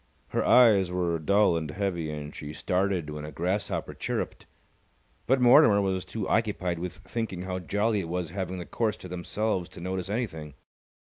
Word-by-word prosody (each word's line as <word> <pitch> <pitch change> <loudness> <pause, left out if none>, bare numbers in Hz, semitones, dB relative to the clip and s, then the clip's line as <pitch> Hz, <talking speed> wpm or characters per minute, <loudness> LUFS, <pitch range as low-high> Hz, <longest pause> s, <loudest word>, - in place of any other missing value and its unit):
Her - - 0
eyes 105 -7 +6
were 85 -2 0
dull 100 +3 +3
and 80 -2 -2
heavy, 85 -2 -2
and 75 -1 -6
she 75 0 -7
started 90 -3 0
when 75 0 -6
a 75 - -6
grasshopper 90 +7 -2
chirruped. - - -4 0.8
But 135 +2 +4
Mortimer 125 -3 +7
was 95 -2 0
too 105 -4 -4
occupied 95 -6 0
with 90 +1 -4
thinking 110 -6 -3
how 95 0 -3
jolly 105 +5 0
it 85 -4 -4
was 90 -2 -3
having 95 -1 -3
the 90 - -6
course 110 -2 -1
to 90 - -10
themselves 90 +1 -2
to - - -11
notice 95 +1 -3
anything. 80 - -4
90 Hz, 175 wpm, -28 LUFS, 85-105 Hz, 0.8 s, Mortimer